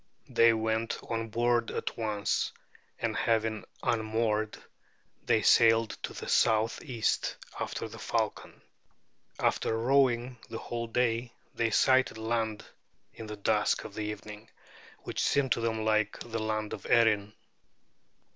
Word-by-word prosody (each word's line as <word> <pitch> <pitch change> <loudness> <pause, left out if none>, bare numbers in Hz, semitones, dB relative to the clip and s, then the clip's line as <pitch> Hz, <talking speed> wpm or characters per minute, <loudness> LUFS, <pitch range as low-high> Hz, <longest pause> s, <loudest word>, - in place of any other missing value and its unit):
They 115 0 +5
went 110 0 -1
on 115 -1 -2
board 120 +1 +1
at - - -3
once; 105 -2 -1 0.5
and - - -2
having 110 -1 0 0.2
unmoored, 110 -2 0 0.7
they 110 - +2
sailed 115 -1 +5
to - - -5
the - - -7
southeast 115 +2 +1 0.2
after - - -3
the - - -11
falcon. - - -3 0.7
After 110 - +1
rowing 125 0 +2
the 115 - -5
whole 115 0 -4
day, 120 0 0 0.2
they 115 -1 +1
sighted 130 +1 +3
land 110 -1 -2 0.5
in 110 - -9
the 105 0 -6
dusk 100 - +1
of - - -9
the 110 - -5
evening, 105 +1 -7 0.5
which - - -3
seemed 140 -3 +2
to 115 - +2
them 110 -1 -1
like 110 -1 +1
the 115 -1 -4
land 110 -1 -2
of - - -7
Erin. 105 -3 +3
115 Hz, 130 wpm, -30 LUFS, 110-115 Hz, 0.7 s, They